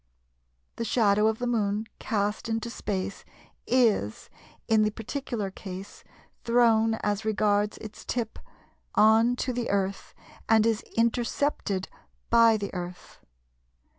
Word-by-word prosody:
The - - -2
shadow 210 -2 +3
of 220 0 +1
the 245 - -3
Moon 215 -3 0
cast 210 +1 -1
into 225 +1 -2
space 200 -3 -4 0.4
is, 225 - +1 0.4
in 220 -1 +4
the 215 - +3
particular 225 -2 -4
case, 190 0 -9 0.4
thrown 225 -2 +4
as 205 +1 0
regards 210 -1 +1
its 215 -1 -10
tip 230 -3 -3 0.6
on 225 +3 +5
to 255 0 -2
the 240 -1 -2
Earth 195 -1 -2 0.3
and 220 -1 +5
is 225 -1 +1 0.2
intercepted 230 -3 0 0.4
by 230 -1 +6
the 200 -1 -5
Earth. 180 -1 -7
220 Hz, 120 wpm, -27 LUFS, 205-230 Hz, 0.6 s, by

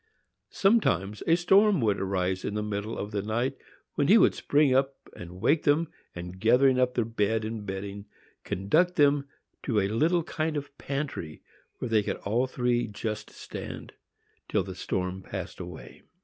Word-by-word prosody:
Sometimes 105 - +2
a 165 - +6
storm 195 +2 +4
would 105 -3 +1
arise 95 -1 -1
in 105 - -3
the 105 - -1
middle 105 +1 -3
of 105 - -4
the 100 -2 -1
night, 120 +6 -1 0.4
when 145 - +1
he 210 - +7
would - - +5
spring 145 -2 +2
up 135 +1 +2 0.2
and 90 +1 -9
wake 145 - +3
them, 150 +2 +2 0.3
and, 90 +1 -7
gathering 125 +4 +4
up 125 0 +2
their 120 - +1
bed 110 -1 0
and 110 -2 -5
bedding, 100 +1 -5 0.4
conduct 160 - +1
them 145 -1 +3 0.3
to 115 -6 +1
a 95 - +1
little 160 - +2
kind 155 -1 -2
of 145 - -3
a 140 - -21
pantry, 135 - -4 0.3
where 125 - -4
they 110 -1 +4
could - - -3
all 120 +6 +1
three 120 -2 0
just 105 +1 -5
stand, - - -8 0.6
till 105 - +1
the 95 0 -7
storm 90 +1 -3
passed - - -7
away. - - -9
115 Hz, 175 wpm, -28 LUFS, 100-145 Hz, 0.6 s, he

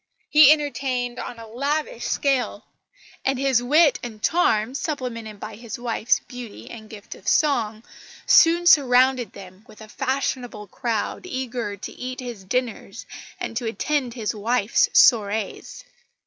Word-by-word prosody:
He 300 -1 +8
entertained 260 -5 -1
on 240 - -6
a 230 - -10
lavish 285 - -3
scale; 275 -3 -1 0.6
and 270 0 0
his 265 -2 +2
wit 295 +4 +4
and 225 -3 -8
charm, 250 -9 +2
supplemented 245 -8 -5
by 215 0 -8
his 235 +2 -7
wife's 240 -1 0
beauty 245 -4 -10
and 220 -2 -11
gift 210 -2 -10
of 190 - -16
song, 230 -8 +1 0.4
soon 340 +1 +5
surrounded 255 - +4
them 190 0 -13
with 215 - -16
a 215 - -11
fashionable 255 -3 -3
crowd 230 - -3
eager 245 - -4
to - - -8
eat 255 0 -7
his 240 -6 -7
dinners 250 +4 -4 0.3
and - - -5
to 240 -1 -3
attend 255 +1 -2
his 225 -3 -2
wife's 220 +1 +1
soirées. 215 -3 +2
245 Hz, 140 wpm, -23 LUFS, 220-270 Hz, 0.6 s, He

